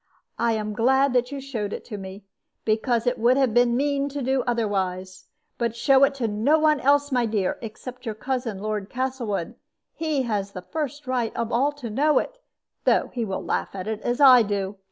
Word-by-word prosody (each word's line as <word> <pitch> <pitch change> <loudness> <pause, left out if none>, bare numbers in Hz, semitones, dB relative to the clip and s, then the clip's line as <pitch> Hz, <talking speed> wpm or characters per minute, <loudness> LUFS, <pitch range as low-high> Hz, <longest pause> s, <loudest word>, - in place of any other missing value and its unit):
I 235 -1 +2
am 215 -1 -2
glad 265 +4 +3
that 250 +1 +1
you 280 - -4
showed 235 -7 -4
it - - -6
to 210 - -6
me, 190 +1 -9 0.4
because 225 +2 +1
it 245 0 0
would 245 +3 +4
have 265 -5 +2
been 240 0 +3
mean 280 0 0
to 285 -1 -4
do 265 +1 +1
otherwise. 190 -5 -2 0.3
But 235 -1 -1
show 270 +3 +4
it 275 0 -2
to 250 -4 -1
no 220 +9 +2
one 305 -1 +3
else, 285 +2 +3
my 245 -3 +2
dear, 210 -4 -1
except 245 +3 -8
your 220 - -3
cousin, 245 -2 -3
Lord 210 0 -3
Castlewood. 245 -8 -3 0.4
He 310 -4 -1
has 205 -4 -2
the 185 - -7
first 295 - -4
right 250 -3 -1
of 230 0 -2
all 270 +5 +2
to 255 -6 -7
know 295 +7 +3
it, - - -2 0.4
though - - +2
he 240 - -2
will 195 -3 -3
laugh - - -2
at 185 - -5
it 220 -1 -3
as 240 +1 -1
I 260 -4 +8
do. 200 -2 -2
240 Hz, 205 wpm, -24 LUFS, 210-270 Hz, 0.4 s, I